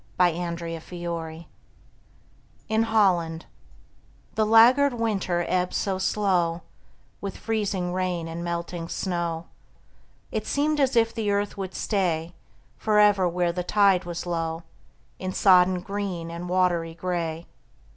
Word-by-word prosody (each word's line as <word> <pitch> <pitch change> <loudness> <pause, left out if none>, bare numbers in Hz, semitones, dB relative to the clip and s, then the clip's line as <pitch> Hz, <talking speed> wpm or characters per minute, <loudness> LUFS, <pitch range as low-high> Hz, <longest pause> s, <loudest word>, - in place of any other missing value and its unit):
FLOOD 175 -1 +1
TIDE - - -10 0.2
OF 160 - -12
FLOWERS 170 -2 -6 1.3
IN 220 +1 +2
HOLLAND 180 -7 +2 0.9
The 215 -1 +1
laggard 245 +5 +6
winter 195 -7 -1
ebbed 180 0 0
so 190 -2 -1
slow 180 -4 +1 0.6
With 200 -1 -5
freezing 200 -5 -2
rain 180 -2 -2
and 165 +1 -5
melting 170 0 -4
snow, 170 -3 -2 0.9
It 215 -1 -3
seemed 300 +1 +1
as 270 -2 +2
if 230 -1 +3
the 220 -3 -2
earth 205 0 0
would 190 -2 -6
stay 175 -5 -1 0.4
Forever 210 -3 +4
where 175 0 0
the 180 +1 -3
tide 195 -2 +3
was 175 0 -5
low, 165 -1 -2 0.6
In 185 0 -4
sodden 185 -2 +5
green 190 -4 -4
and 170 +1 -6
watery 175 -3 +1
gray. 170 -2 -3
180 Hz, 125 wpm, -25 LUFS, 170-205 Hz, 1.3 s, laggard